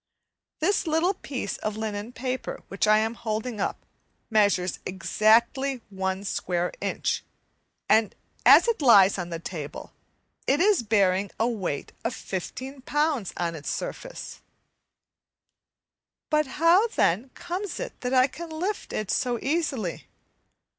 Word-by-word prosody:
This 375 Hz, +2 st, +1 dB
little 325 Hz, +4 st, +2 dB
piece 275 Hz, -8 st, -5 dB
of 215 Hz, 0 st, -3 dB
linen 215 Hz, 0 st, -4 dB
paper, 255 Hz, +1 st, -4 dB
which 195 Hz, +2 st, 0 dB
I 215 Hz, 0 st, +6 dB
am 220 Hz, +1 st, +1 dB
holding 220 Hz, -1 st, -3 dB
up, -, -, -3 dB, 0.5 s
measures 200 Hz, -4 st, +2 dB
exactly 235 Hz, +7 st, +2 dB
a 190 Hz, +1 st, -2 dB
square 180 Hz, -2 st, -1 dB
inch, -, -, -1 dB, 0.6 s
and 220 Hz, -2 st, +3 dB, 0.3 s
as -, -, +8 dB
it 465 Hz, -8 st, 0 dB
lies 200 Hz, -7 st, +6 dB
on 175 Hz, -1 st, -4 dB
the 170 Hz, -, -3 dB
table, 160 Hz, -3 st, -7 dB, 0.5 s
it 280 Hz, +2 st, +3 dB
is 395 Hz, -, +4 dB
bearing 200 Hz, -3 st, +2 dB
a 225 Hz, -, +3 dB
weight 190 Hz, -11 st, -3 dB
of 230 Hz, -, -2 dB
15 260 Hz, +9 st, -6 dB
lbs. 295 Hz, -, 0 dB
on 170 Hz, -1 st, -1 dB
its 155 Hz, -2 st, -6 dB
surface. -, -, -6 dB, 1.9 s
But 305 Hz, -1 st, +3 dB
how, 340 Hz, +8 st, +5 dB
then, 230 Hz, -, +1 dB
comes 365 Hz, +3 st, -4 dB
it -, -, -6 dB
that 250 Hz, -, -2 dB
I 255 Hz, 0 st, +6 dB
can 335 Hz, +5 st, -7 dB
lift 360 Hz, +6 st, -3 dB
it 215 Hz, -2 st, -2 dB
so 245 Hz, -2 st, 0 dB
easily? 270 Hz, -, -2 dB
230 Hz, 135 wpm, -26 LUFS, 195-300 Hz, 1.9 s, as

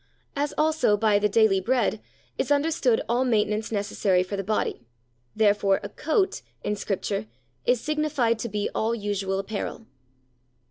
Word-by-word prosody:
As, 290 Hz, +1 st, 0 dB
also, 310 Hz, -9 st, +3 dB
by 210 Hz, -1 st, +3 dB
"the 210 Hz, 0 st, +2 dB
daily 210 Hz, -2 st, +4 dB
bread" 230 Hz, -1 st, +1 dB, 0.3 s
is -, -, -2 dB
understood 285 Hz, -5 st, +2 dB
all 240 Hz, +2 st, +2 dB
maintenance 215 Hz, -3 st, 0 dB
necessary 200 Hz, -3 st, +1 dB
for 185 Hz, +2 st, -5 dB
the 195 Hz, -, -3 dB
body, 215 Hz, -, -1 dB, 0.5 s
therefore 205 Hz, -2 st, +3 dB
"a -, -, -5 dB
coat," 380 Hz, +5 st, 0 dB, 0.2 s
in 210 Hz, -, -1 dB
Scripture, 195 Hz, -, -3 dB, 0.4 s
is 245 Hz, -, +4 dB
signified 300 Hz, -6 st, 0 dB
to 235 Hz, -, -3 dB
be 210 Hz, 0 st, -1 dB
all 225 Hz, +2 st, 0 dB
usual 200 Hz, -3 st, -2 dB
apparel. 210 Hz, +3 st, -4 dB
220 Hz, 145 wpm, -25 LUFS, 205-255 Hz, 0.5 s, daily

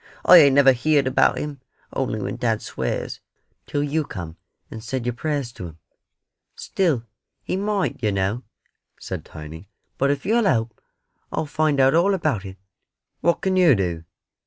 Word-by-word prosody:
I 180 Hz, -, +9 dB
ain't 140 Hz, -5 st, +6 dB
never 140 Hz, -1 st, +7 dB
heerd 140 Hz, +3 st, +2 dB
about 130 Hz, -, +3 dB
Him, 145 Hz, -3 st, -5 dB, 0.3 s
only 130 Hz, -5 st, -2 dB
when -, -, -4 dB
dad 115 Hz, -3 st, -1 dB
swears, -, -, -4 dB, 0.5 s
till 145 Hz, -, -1 dB
you 150 Hz, +2 st, 0 dB
come 85 Hz, -, -8 dB, 0.4 s
and 110 Hz, -, -8 dB
said 125 Hz, +1 st, -4 dB
your 125 Hz, -, -1 dB
prayers 140 Hz, -2 st, -3 dB
to 90 Hz, -6 st, -8 dB
Him." 80 Hz, -1 st, -13 dB, 0.8 s
"Still, 155 Hz, -12 st, -1 dB, 0.4 s
He -, -, -2 dB
might, 200 Hz, 0 st, -1 dB
yer 110 Hz, -, +1 dB
know," 100 Hz, +4 st, -1 dB, 0.6 s
said -, -, -6 dB
Tiny; 80 Hz, +5 st, -11 dB, 0.3 s
"but 140 Hz, -, +2 dB
if 145 Hz, +4 st, -1 dB
you'll 225 Hz, +3 st, +2 dB
help, 115 Hz, -, 0 dB, 0.5 s
I'll -, -, -2 dB
find 150 Hz, -1 st, 0 dB
out 135 Hz, +1 st, +5 dB
all 185 Hz, +5 st, +3 dB
about 145 Hz, -, -1 dB
it." 95 Hz, 0 st, -9 dB, 0.6 s
"What 170 Hz, +2 st, +1 dB
can 190 Hz, -1 st, 0 dB
yer 175 Hz, -7 st, +5 dB
do?" 85 Hz, -5 st, -2 dB
135 Hz, 165 wpm, -22 LUFS, 110-155 Hz, 0.8 s, I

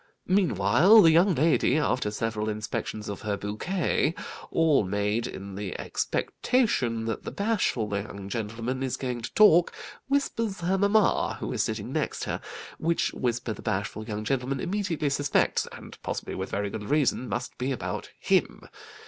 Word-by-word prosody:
Meanwhile, 185 Hz, -, +5 dB
the 165 Hz, -, +7 dB
young 175 Hz, +3 st, +4 dB
lady, 155 Hz, -1 st, +3 dB
after 130 Hz, -7 st, +1 dB
several 110 Hz, 0 st, -2 dB
inspections 105 Hz, 0 st, -4 dB
of 100 Hz, -, -5 dB
her 105 Hz, -2 st, -2 dB
bouquet, 155 Hz, -, -1 dB, 0.3 s
all 160 Hz, -7 st, +3 dB
made 105 Hz, +4 st, -1 dB
in 100 Hz, +1 st, -8 dB
the 100 Hz, -1 st, -5 dB
expectation 125 Hz, -, 0 dB
that 115 Hz, -, -2 dB
the -, -, -5 dB
bashful 185 Hz, -, 0 dB
young 100 Hz, -1 st, -5 dB
gentleman 115 Hz, +4 st, -3 dB
is 130 Hz, -1 st, -1 dB
going 125 Hz, -2 st, -3 dB
to 115 Hz, -, -6 dB
talk, 175 Hz, -5 st, +6 dB, 0.4 s
whispers 230 Hz, -8 st, -1 dB
her 185 Hz, +3 st, +1 dB
mamma, 200 Hz, +2 st, +3 dB
who -, -, -3 dB
is -, -, 0 dB
sitting -, -, -3 dB
next -, -, -2 dB
her, -, -, -3 dB, 0.4 s
which 165 Hz, +1 st, 0 dB
whisper 120 Hz, -2 st, -1 dB
the -, -, -11 dB
bashful 100 Hz, +2 st, -2 dB
young 105 Hz, -1 st, -4 dB
gentleman 135 Hz, +2 st, -1 dB
immediately 185 Hz, -5 st, -1 dB
suspects 145 Hz, +1 st, +1 dB
(and -, -, -11 dB
possibly -, -, -4 dB
with -, -, -4 dB
very 100 Hz, 0 st, -2 dB
good 105 Hz, -1 st, -6 dB
reason) 140 Hz, -4 st, +1 dB
must 120 Hz, +3 st, -3 dB
be 130 Hz, +2 st, -1 dB
about 130 Hz, -, -4 dB
him. -, -, +1 dB
125 Hz, 155 wpm, -27 LUFS, 110-170 Hz, 0.4 s, the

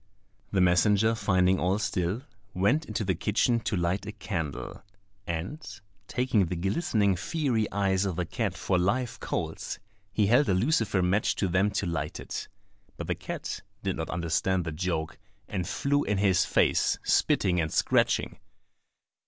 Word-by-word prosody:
The 95 Hz, -, +2 dB
messenger 100 Hz, +5 st, +4 dB
finding 95 Hz, -4 st, +2 dB
all 95 Hz, +2 st, +1 dB
still, 95 Hz, +2 st, -1 dB, 0.3 s
went 120 Hz, -, +2 dB
into 110 Hz, -2 st, -3 dB
the 95 Hz, -, +2 dB
kitchen 110 Hz, +6 st, +1 dB
to 115 Hz, -, -2 dB
light 90 Hz, +4 st, -1 dB
a -, -, -3 dB
candle, 95 Hz, -8 st, -5 dB, 0.5 s
and, 85 Hz, -, -4 dB, 0.5 s
taking 125 Hz, -7 st, +1 dB
the 90 Hz, -, -3 dB
glistening 100 Hz, -, +1 dB
fiery 125 Hz, -, -1 dB
eyes 95 Hz, -1 st, +1 dB
of 95 Hz, -3 st, -1 dB
the 90 Hz, 0 st, -1 dB
cat -, -, -2 dB
for 90 Hz, -, +1 dB
live 120 Hz, +7 st, 0 dB
coals, -, -, -3 dB, 0.3 s
he 105 Hz, +1 st, +2 dB
held 120 Hz, +6 st, +4 dB
a 95 Hz, -, +3 dB
lucifer 105 Hz, -, +2 dB
match 95 Hz, +4 st, +2 dB
to 100 Hz, -, 0 dB
them 95 Hz, +3 st, +2 dB
to -, -, 0 dB
light 80 Hz, -4 st, -3 dB
it. -, -, -5 dB, 0.5 s
But -, -, -5 dB
the -, -, 0 dB
cat -, -, -5 dB, 0.2 s
did -, -, -1 dB
not -, -, -4 dB
understand 85 Hz, +2 st, 0 dB
the 80 Hz, -, -3 dB
joke, 80 Hz, 0 st, -3 dB, 0.3 s
and 90 Hz, -4 st, -3 dB
flew 145 Hz, +1 st, +1 dB
in 105 Hz, 0 st, 0 dB
his 95 Hz, -2 st, +3 dB
face, -, -, +2 dB
spitting 90 Hz, -2 st, +2 dB
and 80 Hz, -1 st, -2 dB
scratching. -, -, +1 dB
95 Hz, 160 wpm, -28 LUFS, 90-110 Hz, 0.5 s, messenger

